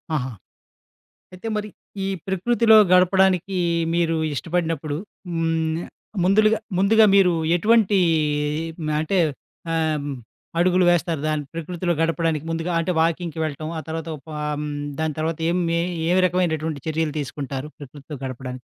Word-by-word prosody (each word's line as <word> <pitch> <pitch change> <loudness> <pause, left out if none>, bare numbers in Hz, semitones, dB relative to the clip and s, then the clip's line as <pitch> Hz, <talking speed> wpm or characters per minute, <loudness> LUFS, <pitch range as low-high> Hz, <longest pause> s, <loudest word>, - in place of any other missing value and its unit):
ఆహా! 130 -3 -1 1.0
అయితే 185 +5 -7
మరి 210 0 -3 0.4
ఈ - - -1 0.2
ప్రకృతిలో 220 +4 +4 0.2
గడపడానికి 185 0 +4 0.4
మీరు 170 -1 +1 0.2
ఇష్టపడినప్పుడు 160 -2 -2 0.3
హ్మ్. 165 0 0 0.4
ముందులుగా 215 +3 +4 0.2
ముందుగా 220 +3 +5
మీరు 190 -3 +5 0.2
ఎటువంటి 215 +2 +3 1.0
అంటే 170 +5 0 0.5
ఆహ్, 155 -3 0 0.5
అడుగులు 180 +1 +3
వేస్తారు, 170 -3 +1
దాన్ని 155 -1 -1
ప్రకృతిలో 175 +2 -2
గడపడానికి 165 -2 0
ముందుగా? 165 +2 -2
అంటే 175 +2 -1
వాకింగ్‌కి 165 0 0
వెళ్ళటం 155 +1 -4
ఆ - - -2
తర్వాత 160 +1 -4 0.3
ఆహ్, - - -2 0.2
హ్మ్. 150 - -3 0.3
దాని 160 -2 -1
తర్వాత 160 0 -1
ఏం 175 - +1 0.2
ఏ, - - 0 0.3
ఏ - - +2 0.2
రకమైనటువంటి 160 -5 -1
చర్యలు 160 -1 -1
తీసుకుంటారు 140 0 -5
ప్రకృతితో 145 +1 -10
గడపడానికి? 130 0 -6
165 Hz, 120 wpm, -23 LUFS, 155-185 Hz, 1.0 s, ముందుగా